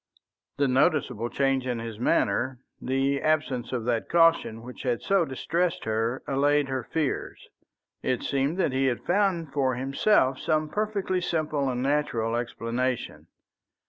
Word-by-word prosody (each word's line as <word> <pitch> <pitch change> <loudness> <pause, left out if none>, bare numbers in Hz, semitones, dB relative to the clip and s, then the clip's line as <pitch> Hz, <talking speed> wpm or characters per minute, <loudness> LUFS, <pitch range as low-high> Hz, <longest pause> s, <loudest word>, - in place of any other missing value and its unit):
The 140 0 +2
noticeable 125 -3 +1
change 135 -1 0
in 125 -2 -1
his 115 -2 -6
manner, 125 +3 +1 0.2
the 135 +2 0
absence 145 -6 0
of 120 -3 -2
that 120 -2 -1
caution 165 -9 +3
which 125 +1 -9
had 125 -3 -1
so 195 -3 +3
distressed 170 +6 -1
her, 115 +3 -1
allayed 145 +1 +2
her 130 -1 -1
fears. 150 +3 -3 0.5
It 125 -2 -1
seemed 140 +4 0
that 185 - +1
he 135 +1 +1
had 125 -2 -1
found 175 -6 +1
for 130 -3 +1
himself 135 - +2
some 155 0 0
perfectly 205 -3 -1
simple 155 -5 -1
and 125 0 -2
natural 130 -6 0
explanation. 120 +1 -3
135 Hz, 145 wpm, -27 LUFS, 125-155 Hz, 0.5 s, caution